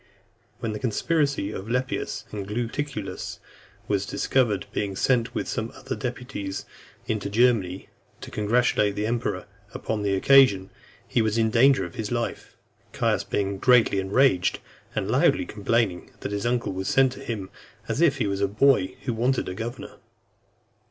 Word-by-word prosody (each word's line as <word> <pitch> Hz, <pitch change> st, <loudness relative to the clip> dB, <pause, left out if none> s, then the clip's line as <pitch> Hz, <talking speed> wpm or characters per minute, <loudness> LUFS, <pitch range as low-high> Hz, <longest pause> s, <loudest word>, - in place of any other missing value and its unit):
When 115 Hz, -3 st, -2 dB
the 105 Hz, -, -4 dB
conspiracy 140 Hz, -1 st, 0 dB
of 105 Hz, +1 st, -6 dB
Lepidus 125 Hz, +2 st, -2 dB
and 100 Hz, -2 st, -5 dB
Gaetulicus 115 Hz, 0 st, -4 dB, 0.5 s
was 100 Hz, -1 st, 0 dB
discovered, 110 Hz, -7 st, +1 dB
being 100 Hz, -2 st, -2 dB
sent 120 Hz, +2 st, +1 dB
with -, -, -2 dB
some 115 Hz, -1 st, -3 dB
other -, -, -5 dB
deputies 125 Hz, -6 st, -5 dB, 0.4 s
into 105 Hz, -2 st, -2 dB
Germany, 105 Hz, -5 st, +2 dB, 0.3 s
to -, -, -8 dB
congratulate 105 Hz, -1 st, +2 dB
the 105 Hz, +1 st, -1 dB
emperor 115 Hz, -5 st, -2 dB, 0.3 s
upon 110 Hz, -2 st, -2 dB
the 100 Hz, -1 st, +1 dB
occasion, 100 Hz, -4 st, +5 dB, 0.4 s
he 120 Hz, -, +1 dB
was 110 Hz, 0 st, 0 dB
in 110 Hz, -1 st, +2 dB
danger 125 Hz, -4 st, +5 dB
of 85 Hz, -, -9 dB
his 110 Hz, 0 st, -4 dB
life; 120 Hz, -1 st, -3 dB, 0.4 s
Caius -, -, +1 dB
being 100 Hz, -1 st, -2 dB
greatly 120 Hz, -5 st, +4 dB
enraged, 95 Hz, -1 st, +3 dB, 0.4 s
and -, -, -1 dB
loudly -, -, +3 dB
complaining, 105 Hz, -3 st, 0 dB
that -, -, -4 dB
his 100 Hz, +2 st, -1 dB
uncle 120 Hz, -4 st, 0 dB
was 95 Hz, +1 st, -4 dB
sent 135 Hz, -1 st, +4 dB
to 130 Hz, -, -9 dB
him, 110 Hz, -7 st, -5 dB, 0.4 s
as -, -, -1 dB
if 150 Hz, -5 st, +4 dB
he 120 Hz, -, 0 dB
was 100 Hz, -1 st, -2 dB
a 100 Hz, -, +3 dB
boy 105 Hz, -3 st, +3 dB
who 125 Hz, -, -1 dB
wanted 125 Hz, +4 st, 0 dB
a 90 Hz, -, -3 dB
governor. 120 Hz, +6 st, -6 dB
110 Hz, 160 wpm, -25 LUFS, 100-125 Hz, 0.5 s, occasion